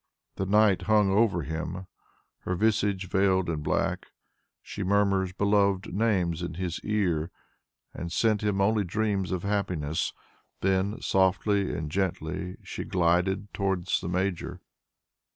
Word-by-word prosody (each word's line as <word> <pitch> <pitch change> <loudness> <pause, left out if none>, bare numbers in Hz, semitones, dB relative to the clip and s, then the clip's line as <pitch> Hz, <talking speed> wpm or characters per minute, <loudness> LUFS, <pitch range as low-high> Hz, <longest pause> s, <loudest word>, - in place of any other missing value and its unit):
The 95 - -2
night 100 -2 +4
hung 105 -2 +4
over 100 -5 +2
him, 80 +5 -4 0.5
her 90 - -3
visage 105 -2 +1
veiled 95 -1 +2
in 75 -2 -3
black; - - -1 0.6
she 105 - -7
murmured 95 -1 +1
beloved 100 -2 +2
names 95 -6 +1
in 85 -2 -4
his 90 -1 -3
ear, 90 -7 0 0.6
and 85 0 -6
sent 105 +4 +2
him 105 -2 0
only 105 +1 +3
dreams 100 0 -1
of 90 -2 -2
happiness; 90 -7 -1 0.5
then, 95 +2 +1
softly 95 +1 +2
and 80 -3 -4
gently, 90 -1 -2
she - - -5
glided 90 +3 +1
towards 95 -2 0
the 85 - -4
Major. 90 0 -2
95 Hz, 130 wpm, -27 LUFS, 90-100 Hz, 0.6 s, night